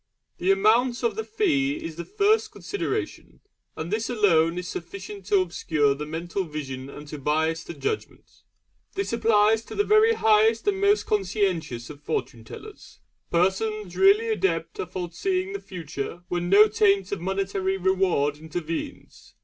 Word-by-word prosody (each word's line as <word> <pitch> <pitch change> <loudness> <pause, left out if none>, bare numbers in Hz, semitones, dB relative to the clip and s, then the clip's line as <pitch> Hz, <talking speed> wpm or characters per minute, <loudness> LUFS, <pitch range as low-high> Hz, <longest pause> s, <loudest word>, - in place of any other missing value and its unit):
The 180 - 0
amount 230 +6 +3
of 235 - +1
the 445 - -3
fee 315 -12 +1
is 165 - -6
the 170 - -5
first 420 +2 +2
consideration, 405 - -4 0.4
and 160 +3 -5
this 220 +1 -1
alone 175 -8 +3
is 180 0 -4
sufficient 195 +3 -8
to 200 -2 +4
obscure 155 -5 +1
the 150 +2 -6
mental 170 +5 -3
vision 135 -5 -6
and 150 +1 -10
to 150 - -7
bias 160 +3 0
the 170 - -8
judgment. 430 0 -5 0.5
This 395 -9 -2
applies 220 -1 +3
to - - -9
the 410 - +2
very 430 +2 +4
highest 220 - +3
and 395 -1 +1
most 405 +1 +3
conscientious 180 - -1
of 145 -1 -13
Fortune 120 -6 -3
tellers 420 - -12 0.3
persons 190 +2 0
really 410 +4 +5
adept 420 0 -1
at 415 - -4
foreseeing 370 - -2
the 400 - -4
future 165 - -6
when 175 0 -2
no 205 +3 +7
taint 200 -2 +2
of 200 - -3
monetary 190 +1 -1
reward 185 -6 +1
intervenes. 160 +1 -6
195 Hz, 155 wpm, -25 LUFS, 165-240 Hz, 0.5 s, no